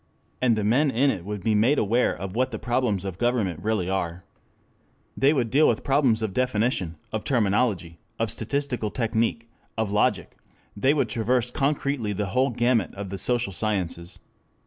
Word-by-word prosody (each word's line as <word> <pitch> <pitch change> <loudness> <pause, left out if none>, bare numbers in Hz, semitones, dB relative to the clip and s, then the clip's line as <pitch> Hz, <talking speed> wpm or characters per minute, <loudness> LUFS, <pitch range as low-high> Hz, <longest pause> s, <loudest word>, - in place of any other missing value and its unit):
And 125 -3 +3
the 105 - -1
men 130 +8 +3
in 135 +3 +2
it 90 -6 -6
would 105 -2 -5
be 110 - +2
made 115 +8 +3
aware 115 +4 +2
of 95 +1 -6
what 130 +2 +1
the 115 - -5
problems 120 -5 -1
of 95 -1 -5
government 110 -9 0
really 105 -4 0
are. 90 -2 -2 0.9
They 135 +2 +4
would 125 -7 0
deal 150 +3 +5
with - - +1
problems 135 -5 +2
of 105 -3 -2
definition, 110 -8 0
of 110 - -3
terminology, 100 -8 0 0.2
of 115 -2 0
statistical 125 0 -2
technic, 115 0 -1 0.3
of 110 -2 -1
logic; 105 0 +1 0.4
they 130 +8 +2
would 135 -5 +1
traverse 120 +2 0
concretely 140 -6 -1
the 105 +1 -2
whole 130 +2 +3
gamut 120 -5 +1
of 100 -1 -6
the 95 - -4
social 120 -5 0
sciences. 90 -4 -3
110 Hz, 170 wpm, -25 LUFS, 100-125 Hz, 0.9 s, deal